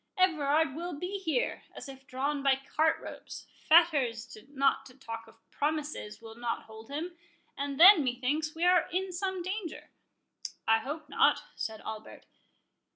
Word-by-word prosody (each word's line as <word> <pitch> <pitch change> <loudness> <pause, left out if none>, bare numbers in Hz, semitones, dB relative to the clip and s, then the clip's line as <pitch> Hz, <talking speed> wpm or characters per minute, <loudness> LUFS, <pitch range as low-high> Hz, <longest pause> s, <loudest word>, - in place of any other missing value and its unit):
—Everard 315 -5 +2
will 345 +4 -5
be 370 +5 -4
here, 320 -9 -1
as - - -8
if 270 -1 -12
drawn 280 +3 -2
by 275 -1 +4 0.2
cart 315 +1 +3
ropes— - - -9 0.2
fetters, 280 -9 +4
not 275 -1 +1
to 255 - -16
talk 230 -3 -7
of 225 - -17 0.2
promises, 295 -7 -3
will 225 -1 -11
not 235 0 -3
hold 220 0 -13
him—and 335 -3 -7
then, 360 -2 +9
methinks, 270 +5 -1
we 335 +2 0
are 360 -1 +4
in 375 +2 -1
some 375 0 -2
danger." 375 -2 -5 0.8
"I 225 0 +5
hope 295 +6 -6
not," 280 - +3
said 220 -2 -4
Albert. 220 0 -8
290 Hz, 150 wpm, -30 LUFS, 255-340 Hz, 0.8 s, then